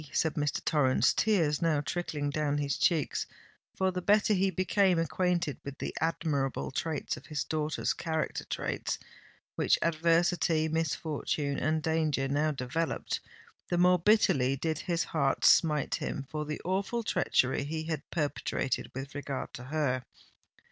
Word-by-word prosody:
said 160 - +1
Mr. 145 -1 -2
Torrens, 135 -5 +3
tears 165 -9 +2
now 165 -3 +2
trickling 150 -2 -2
down 145 -1 0
his 145 -1 -1
cheeks—for 180 +3 -1
the 180 0 -3
better 210 +3 +4
he 195 0 +2
became 185 0 +2
acquainted 170 -2 0
with 140 0 -7
the - - -4
admirable 155 -5 -1
traits 155 +2 -2
of 120 - -13
his 150 -1 -2
daughter's 155 -1 -1
character—traits 160 -1 -2 0.6
which - - +2
adversity, 165 0 +2
misfortune, 155 -2 -1
and 155 0 0
danger 155 -4 +1
now 145 +3 +1
developed—the 155 +5 -4
more 180 0 +5
bitterly 165 - +3
did 155 +2 -2
his 170 +1 0
heart 140 -4 0
smite 150 -4 +4
him 140 - -3
for 150 -1 -3
the 150 0 -4
awful 195 +6 -1
treachery 130 -11 +1
he 155 +2 -3
had 160 -3 -3
perpetrated 145 -4 -2
with 135 +1 -6
regard 145 -1 -5
to 125 - -8
her. 130 -3 0
155 Hz, 135 wpm, -30 LUFS, 145-170 Hz, 0.6 s, more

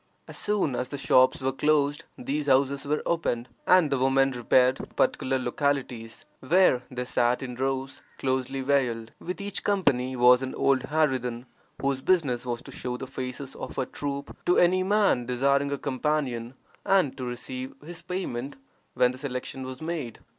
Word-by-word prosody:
As - - -9
soon 205 -11 0
as 125 +1 -3
the 140 - -5
shops 130 -1 +4
were 130 0 +1
closed 145 +1 +1
these 145 +3 -3
houses 135 0 +2
were 150 +1 -1
opened, 125 -8 -1 0.2
and 180 -5 +5
the 135 - +1
women 135 +1 +3
repaired 125 +1 +3
to - - -7
particular 130 0 0
localities, 125 -3 -2
where 150 -3 +4
they 125 -1 -4
sat 125 +1 +1
in 125 -1 -5
rows, 135 +1 -3 0.2
closely 130 0 -1
veiled. 125 -5 0
With 180 +3 -5
each 200 0 -4
company 135 -11 +1
was 125 +1 +6
an 130 0 -4
old 135 -2 +2
harridan, 130 -6 0 0.3
whose 135 -1 0
business 135 -9 +1
was 120 -1 -3
to - - -10
show 125 0 -4
the 130 - -6
faces 130 0 -6
of - - -7
her 130 - -1
troop 140 +1 -5
to 180 - +4
any 180 +1 +4
man 195 - +2
desiring 140 +3 +2
a 140 - -1
companion, 130 -3 -2 0.3
and 185 -9 +2
to 130 - -5
receive 125 +1 -5
his 165 0 -8
payment 170 -8 -4 0.4
when 125 0 +4
the 130 - -10
selection 130 -1 -5
was 130 +2 -7
made. 160 -8 -4
135 Hz, 170 wpm, -27 LUFS, 125-145 Hz, 0.4 s, was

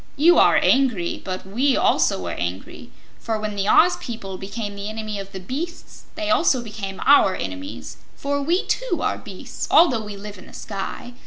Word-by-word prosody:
You 330 +5 +5
are - - +6
angry, 245 -10 +2
but 185 -1 -5
we 255 +8 +1
also 95 - +2
were 85 - -3
angry, 90 +2 -5 0.3
for 225 -1 -2
when 210 -1 -4
the 200 0 -1
Oz 355 +10 +5
people 225 -5 -6
became 205 +1 -5
the 200 +1 -5
enemies 215 -2 -4
of 195 0 -11
the 190 - -6
beasts 295 - -7
they 320 0 -2
also 300 -6 +3
became 200 -4 -6
our 275 -9 +6
enemies; 95 -3 -6 0.2
for 285 0 -2
we, 340 +7 +1
too, - - -1
are - - 0
beasts, - - -7
although 255 -10 +5
we 210 -1 -7
live 205 -1 -9
in - - -14
the - - -15
sky. 205 +4 -6
215 Hz, 185 wpm, -22 LUFS, 195-275 Hz, 0.3 s, are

